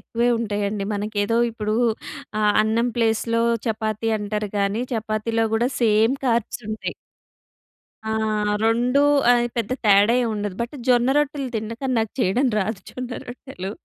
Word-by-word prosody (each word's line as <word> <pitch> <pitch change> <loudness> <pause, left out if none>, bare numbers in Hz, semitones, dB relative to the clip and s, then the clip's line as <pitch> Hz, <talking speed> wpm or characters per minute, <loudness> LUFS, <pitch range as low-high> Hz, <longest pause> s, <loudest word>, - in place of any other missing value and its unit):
ఎక్కువే 235 +1 -1
ఉంటయండి. 205 -2 -2
మనకేదో 205 +2 -1
ఇప్పుడూ 215 -1 -2 0.7
ఆహ్, 210 -1 +4
అన్నం 225 +3 +1
ప్లేస్‌లో 230 0 +1 0.2
చపాతీ 220 0 -1
అంటారు 210 0 -3
గానీ, 200 +3 0
చపాతీలో 225 0 -1
గూడా 235 +2 +2
సేమ్ 225 +2 +4
కార్బ్‌సుంటయి. 230 -2 -2 1.2
ఆ! - - 0 0.5
రొండూ 240 +5 +3 0.3
అయి 240 0 +3
పెద్ద 230 -2 -2
తేడా 205 +2 +5
ఏవుండదు, 210 -4 -3
బట్ 240 +4 -6
జొన్న 245 0 +4
రొట్టెలు 290 -2 -1
తినడం 220 +1 -4
కానీ 260 -1 0
నాకు 220 -2 -3
చెయడం 245 +6 +2
రాదు 210 0 -2
జొన్న 255 -1 -6 0.2
రొట్టెలు 245 -6 -7
225 Hz, 130 wpm, -22 LUFS, 210-240 Hz, 1.2 s, తేడా